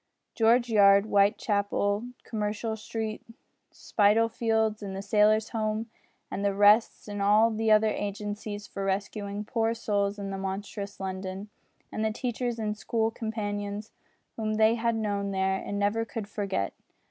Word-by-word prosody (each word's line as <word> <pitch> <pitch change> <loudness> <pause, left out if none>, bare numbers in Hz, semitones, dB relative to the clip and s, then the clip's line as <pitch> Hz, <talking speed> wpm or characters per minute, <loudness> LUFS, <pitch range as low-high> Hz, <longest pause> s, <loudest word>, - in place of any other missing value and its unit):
George 235 +2 +4
Yard, 200 -2 +6
Whitechapel, 205 +1 +1 0.2
Commercial 215 +1 -2
Street, 220 0 -4 0.5
Spitalfields, 220 0 +1
and 195 -2 -5
the 195 - -4
Sailor's 215 +1 +3
Home, 220 0 -2 0.4
and 200 - -3
the 200 -1 +1
Rests, 205 +3 +4
and 205 -1 -4
all 210 +3 +5
the 220 0 0
other 215 0 +5
agencies 205 0 -4
for 195 - -6
rescuing 200 +1 -3
poor 225 0 0
souls 205 -2 -1
in 200 -1 -5
monstrous 200 +1 -5
London, 190 +1 -5 0.4
and 215 - -2
the 220 - +2
teachers 240 +1 -3
and 210 -2 -2
school 225 +1 -1
companions 210 -1 -4 0.5
whom 215 -1 -1
they 220 +1 +5
had 230 0 0
known 205 -2 -1
there 190 0 0
and 200 - -4
never 205 +3 +1
could 225 -2 -6
forget! 195 - -2
210 Hz, 140 wpm, -28 LUFS, 200-220 Hz, 0.5 s, Yard